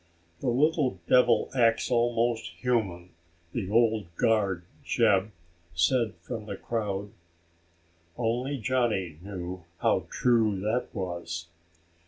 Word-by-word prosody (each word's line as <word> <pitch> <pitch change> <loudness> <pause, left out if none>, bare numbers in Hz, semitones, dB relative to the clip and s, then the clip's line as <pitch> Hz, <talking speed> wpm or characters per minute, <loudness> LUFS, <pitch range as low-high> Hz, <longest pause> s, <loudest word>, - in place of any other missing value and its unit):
"The 130 - 0
little 140 - +2
devil 120 -3 +4
acts 115 -1 +2
almost 120 -1 +1
human," 95 -8 -1 0.4
the 100 -6 -3
old 110 -3 +3
guard, 100 -5 +2 0.2
Jeb, 100 +1 +3 0.5
said 110 +7 +2
from 110 -3 -6
the 100 - -4
crowd. 100 -3 -3 1.1
Only 125 +4 -1
Johnny 110 - 0
knew 90 -2 -6 0.2
how - - +2
true 110 -5 +2
that 115 +5 0
was. 85 -3 -5
110 Hz, 105 wpm, -28 LUFS, 95-120 Hz, 1.1 s, devil